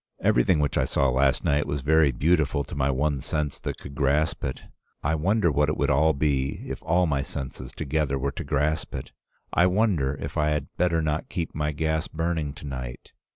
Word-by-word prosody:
Everything -, -, +3 dB
which 75 Hz, -2 st, +1 dB
I -, -, +2 dB
saw 70 Hz, -, +2 dB
last 65 Hz, +1 st, +2 dB
night 75 Hz, +1 st, +1 dB
was 70 Hz, -1 st, -2 dB
very 75 Hz, 0 st, +4 dB
beautiful 75 Hz, +2 st, +2 dB
to 75 Hz, -, -10 dB
my 70 Hz, -2 st, +1 dB
one 70 Hz, +1 st, 0 dB
sense 75 Hz, 0 st, -1 dB
that -, -, -4 dB
could 70 Hz, -, -10 dB
grasp 70 Hz, +3 st, +1 dB
it. 65 Hz, -, -4 dB, 0.4 s
I 70 Hz, -, +1 dB
wonder 90 Hz, +3 st, +2 dB
what 75 Hz, +1 st, +2 dB
it 75 Hz, -, -1 dB
would -, -, +1 dB
all 75 Hz, +4 st, +4 dB
be 70 Hz, -2 st, 0 dB
if -, -, -6 dB
all 90 Hz, +2 st, +2 dB
my 70 Hz, -4 st, 0 dB
senses 65 Hz, -2 st, -5 dB
together 75 Hz, -2 st, -1 dB
were 70 Hz, +1 st, -1 dB
to -, -, -6 dB
grasp 75 Hz, +2 st, -1 dB
it? 65 Hz, -, -6 dB, 0.4 s
I 90 Hz, -, +5 dB
wonder 90 Hz, -9 st, +1 dB
if 70 Hz, +3 st, -5 dB
I 75 Hz, 0 st, +2 dB
had 75 Hz, -2 st, -2 dB
better 85 Hz, -2 st, +1 dB
not 75 Hz, 0 st, -1 dB
keep 85 Hz, -4 st, -3 dB
my 75 Hz, 0 st, -1 dB
gas 80 Hz, +3 st, -1 dB
burning 80 Hz, -3 st, -2 dB
to 75 Hz, -, -11 dB
night? 65 Hz, -3 st, -7 dB
75 Hz, 205 wpm, -26 LUFS, 70-80 Hz, 0.4 s, I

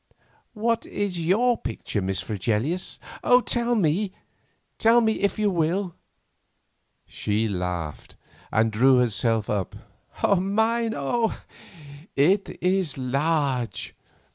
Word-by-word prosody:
"What 230 Hz, +2 st, 0 dB
is 185 Hz, -5 st, -3 dB
your 230 Hz, +8 st, +2 dB
picture, 110 Hz, -3 st, -3 dB
Miss 95 Hz, 0 st, -2 dB
Fregelius? 115 Hz, -, -2 dB, 0.5 s
Tell 240 Hz, 0 st, +1 dB
me, 190 Hz, +1 st, +1 dB, 0.7 s
if 220 Hz, -3 st, +3 dB
you 210 Hz, -1 st, +2 dB
will." 175 Hz, +2 st, 0 dB, 1.1 s
She 105 Hz, +2 st, -1 dB
laughed, 90 Hz, -5 st, -4 dB, 0.4 s
and 110 Hz, 0 st, +2 dB
drew 130 Hz, +4 st, +5 dB
herself 115 Hz, -2 st, +1 dB
up. 100 Hz, -4 st, -2 dB, 0.5 s
"Mine, 220 Hz, +4 st, +1 dB
oh! 225 Hz, -, -1 dB, 0.8 s
it 190 Hz, +8 st, +2 dB
is 180 Hz, -5 st, +1 dB
large. 135 Hz, -1 st, -1 dB
165 Hz, 90 wpm, -25 LUFS, -, 1.1 s, drew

